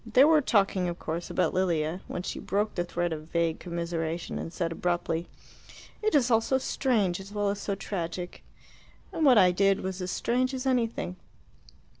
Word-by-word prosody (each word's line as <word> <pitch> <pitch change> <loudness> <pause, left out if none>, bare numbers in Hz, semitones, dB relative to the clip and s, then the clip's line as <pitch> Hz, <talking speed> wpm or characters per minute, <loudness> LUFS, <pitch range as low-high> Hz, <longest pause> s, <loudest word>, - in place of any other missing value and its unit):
They 230 +3 +5
were 310 0 +6
talking, 195 -7 +2
of 170 - -5
course, 170 +1 -4
about 185 - +1
Lilia, 170 -2 0
when 180 - -4
she - - -4
broke 205 +2 -1
the 175 - -1
thread 175 -1 -2
of 155 0 -7
vague 165 -1 0
commiseration 170 -1 -3
and 165 - -5
said 170 -1 -2
abruptly, 175 0 -1 0.7
"It 430 -5 +1
is 255 -4 +3
all 225 0 +5
so 265 +4 +1
strange 220 -9 0
as 195 +1 -10
well 205 -1 0
as 200 0 -3
so 200 - -2
tragic. 180 -2 -5 0.7
And 320 - -1
what 260 -5 +7
I 185 -3 +7
did 195 +2 +2
was 190 0 -4
as 180 - -3
strange 255 +6 0
as 260 +1 -4
anything." 235 -8 0
185 Hz, 185 wpm, -28 LUFS, 175-225 Hz, 0.7 s, what